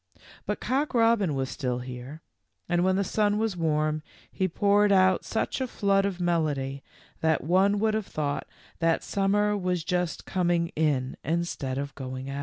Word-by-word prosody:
But - - -1
Cock 275 +2 -1
robin 225 -9 +3
was 135 -1 -1
still 125 -2 -2
here, 125 +5 -8 0.4
and 175 0 +2
when 185 0 +3
the 200 - +1
sun 205 +1 +1
was 220 -3 0
warm 155 -2 0 0.3
he 190 - 0
poured 205 +3 +3
out 185 -2 +4
such 225 +4 -2
a 260 - 0
flood 200 -3 +2
of 190 -2 -4
melody 150 -6 -1 0.4
that 160 -1 +1
one 190 +6 +3
would 220 +1 +1
have 215 -2 -2
thought 145 -1 -2 0.3
that 165 -1 +2
sum 195 0 0
mer 210 0 +2
was 180 -4 -1
just 180 -1 -2
coming 175 -2 +1
in 145 -6 0
instead 155 -5 -2
of 140 0 -4
going 130 0 -6
out. 140 - -4
175 Hz, 175 wpm, -27 LUFS, 145-200 Hz, 0.4 s, out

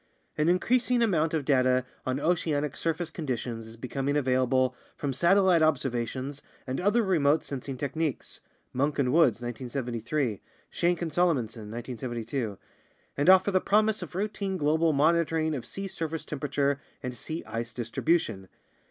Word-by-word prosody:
An 155 +2 +2
increasing 240 +6 +2
amount 165 -8 +2
of 150 -4 -1
data 130 -2 +3 0.2
on 130 +1 0
oceanic 150 -3 0
surface 165 0 -2
conditions 120 -7 -4
is 115 +1 -10
becom 135 +3 -3
ing 145 - +2
available 130 -1 +2 0.2
from 140 -2 -2
satellite 175 +3 +4
observations 135 -1 0 0.2
and 130 +2 -3
other 210 +5 +3
remote 160 -6 +3
sensing 135 -1 -5
techniques 145 +2 -3 0.3
(Munk 140 +3 0
and 130 -2 +1
Woods, 130 -8 +4
1973; 120 0 -3 0.3
Shenk 175 0 +1
and 165 - -3
Salomonson, 125 -11 0
1972) 120 -1 -4 0.6
and 145 +5 +2
offer 190 +2 +6
the 185 -1 +3
promise 215 +1 +2
of 175 -1 -8
routine 200 -1 -2
global 160 +1 +2
monitoring 160 +1 +2
of 130 -5 -5
sea 195 0 -5
surface 160 -3 -4
tem 150 - -5
perature 140 0 0 0.2
and 125 -1 -4
sea 160 +6 -5
ice 115 +2 -4
distribution. 120 - -1
145 Hz, 145 wpm, -28 LUFS, 125-170 Hz, 0.6 s, offer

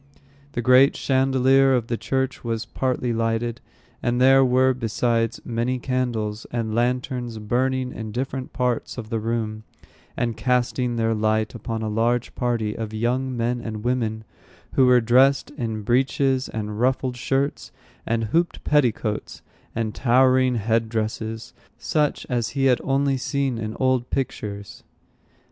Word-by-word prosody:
The 120 - -2
great 130 +3 +6
chandelier 135 0 +3
of 120 -3 0
the 120 - -2
church 130 +2 -2
was 115 -2 -2
partly 125 -1 -1
lighted, 115 +1 -1 0.4
and 120 0 0
there 135 +1 +6
were, 130 +1 +3
besides, 115 -1 0
many 120 +2 -1
candles 120 -4 -2
and 115 -2 -2
lanterns 120 0 -1
burning 125 +4 0
in 110 -1 -6
different 130 +2 -4
parts 125 -1 -2
of 110 -2 -7
the 115 - 0
room, 110 -1 -3 0.5
and 120 -2 -1
casting 125 +1 0
their 115 -1 +1
light 110 0 0
upon 115 -1 -4
a - - -2
large 115 +3 0
party 115 -4 -1
of 110 -1 -5
young 125 +3 -1
men 120 +1 -1
and 110 -2 -6
women, 115 -3 -1 0.5
who 130 - +4
were 125 -1 +6
dressed 130 +4 +3
in 110 -5 -4
breeches 130 +3 +1
and 105 -1 -4
ruffled 130 0 +1
shirts, 135 +3 -1 0.3
and 115 0 -1
hooped 165 +11 0
petticoats 120 -7 0 0.3
and 110 -2 -2
towering 130 0 +3
head 115 +1 0
dresses, 110 0 -3 0.2
such 150 -2 0
as 120 -3 -1
he 135 - +2
had 125 -2 +3
only 135 0 +1
seen 135 -2 -1
in 110 0 -5
old 130 -2 +1
pictures. 100 -6 -4
120 Hz, 145 wpm, -23 LUFS, 115-130 Hz, 0.5 s, great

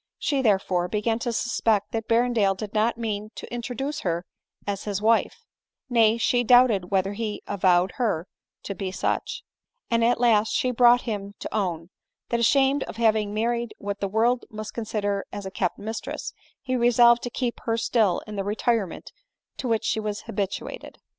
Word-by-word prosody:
She, 280 -3 0
therefore, 190 -6 +1
began 220 +3 -1
to 240 0 -2
suspect 225 -2 0
that 225 -1 -3
Berrendale 230 -4 +2
did 210 +1 -6
not 225 +2 +1
mean 215 -2 -3
to - - -8
intro 240 +1 -4
duce 285 +5 -3
her 175 - -2 0.4
as 200 -1 -3
his 205 -2 -2
wife; 225 +2 +1 0.5
nay, 225 -1 +4
she 245 +1 +2
doubted 240 -7 +5
whether 195 0 +1
he 215 0 -4
avowed 185 -2 +2
her 210 -10 0 0.4
to 200 - -4
be 195 -1 -4
such; 470 - -2 0.5
and 230 0 +3
at 235 +1 +3
last 225 -3 +3
she 255 - +1
brought 245 0 +5
him 200 -3 -5
to - - -7
own, 175 -4 -2 0.4
that 235 - 0
ashamed 270 +4 +3
of - - -9
having 215 -3 +2
majried 235 +2 -1
what 200 0 -5
the 200 - -1
world 235 +5 +1
must 215 -2 -7
consider 205 -3 -2
as 205 - -6
a 190 - -5
kept 185 -2 -1
mistress, 220 +2 -5 0.3
he 255 -1 -1
resolved 240 0 +5
to 245 - -4
keep 245 0 -3
her 225 -1 +1
still 220 -5 +1
in 215 - -8
the 195 - -1
retirement 210 -1 -1 0.5
to 260 - -4
which 225 -2 +1
she - - +1
was 210 -1 -3
habituated. 200 -2 -5
220 Hz, 180 wpm, -25 LUFS, 200-235 Hz, 0.5 s, doubted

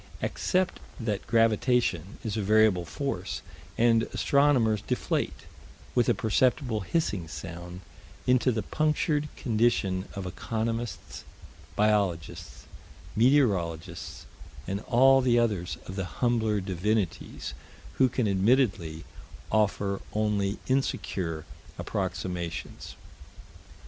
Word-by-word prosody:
Accept 185 0 0 0.2
that 110 -4 -3
gravitation 115 -4 +2
is 110 -2 -2
a 110 - 0
variable 105 -3 +4
force, 80 - -4 0.3
and 115 -1 +4
astronomers 130 -7 +3
deflate, - - -2 0.5
with 120 -2 +3
a - - +4
perceptible 120 +1 +1
hissing 100 - -1
sound, 85 +2 -8 0.4
into 125 0 +3
the 110 -2 -2
punctured 150 -1 0
condition 110 -6 +1
of 100 -1 -4
economists, 115 +5 -4 0.5
biologists, 100 -7 0 0.5
meteorologists, 105 - +1 0.4
and 100 +1 -2
all 135 +2 +6
the 125 -2 +3
others 105 -7 0
of 95 - -7
the 95 -2 -2
humbler 110 -1 0
divinities, 95 +1 -2 0.5
who 130 -1 +5
can 120 -2 0
admittedly 95 -6 +1 0.5
offer 100 -2 +1
only 105 -2 0
insecure 90 - -1 0.3
approximations. 90 -3 -4
110 Hz, 95 wpm, -28 LUFS, 95-120 Hz, 0.5 s, all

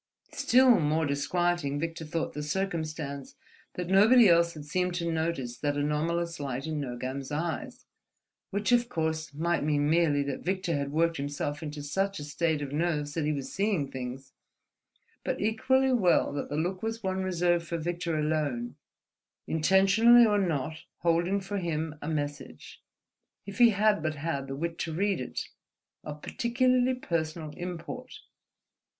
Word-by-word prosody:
Still 250 -3 +5
more 155 +1 +1
disquieting 145 +1 0
Victor 165 0 -4
thought 160 +2 -3
the 150 - -4
circumstance 155 -5 -3 0.4
that 180 -1 -3
nobody 215 +5 +6
else 170 -1 +4
had 150 -1 -8
seemed 180 +3 -1
to 170 -1 -1
notice 160 -7 -2
that 145 0 -1
anomalous 165 +3 -1
light 135 -1 -3
in 155 -1 -3
Nogam's 130 +1 -5
eyes; 160 0 -4 0.6
which 205 +4 -1
of 240 0 +3
course 160 -4 -2
might 165 +3 0
mean 145 -1 +1
merely 155 -3 +3
that 140 -1 -4
Victor 185 -2 -1
had 140 -1 -2
worked 165 +2 +1
himself 145 +1 -3
into 150 -2 -6
such 195 +7 -1
a 150 - -5
state 150 +1 -1
of 140 - -6
nerves 150 -2 -1
that 160 -2 -1
he 150 - +1
was 140 -3 -4
seeing 195 -8 0
things, 130 +1 -7 0.9
but - - -2
equally 260 +5 +2
well 185 - +3
that 145 - -4
the 145 - -3
look 180 +4 -1
was 225 0 -4
one 190 0 -1
reserved 175 -2 +1
for 170 - -2
Victor 170 0 -2
alone, 150 -6 -1 0.7
intentionally 195 +8 +5
or 210 -2 +3
not 160 -5 -1 0.2
holding 175 +3 +2
for 200 +1 -4
him 160 -3 -2
a 145 - -6
message, 145 -2 -5 0.6
if 200 +2 -8
he 240 -1 +8
had 210 -2 +2
but 155 0 -2
had 140 -2 -3
the 135 - -4
wit 165 +3 -4
to 165 - -2
read 195 -2 0
it, 125 - -4 0.6
of 150 0 -8
peculiarly 255 +1 +1
personal 160 -7 -3
import. 180 +10 -7
165 Hz, 155 wpm, -29 LUFS, 145-190 Hz, 0.9 s, he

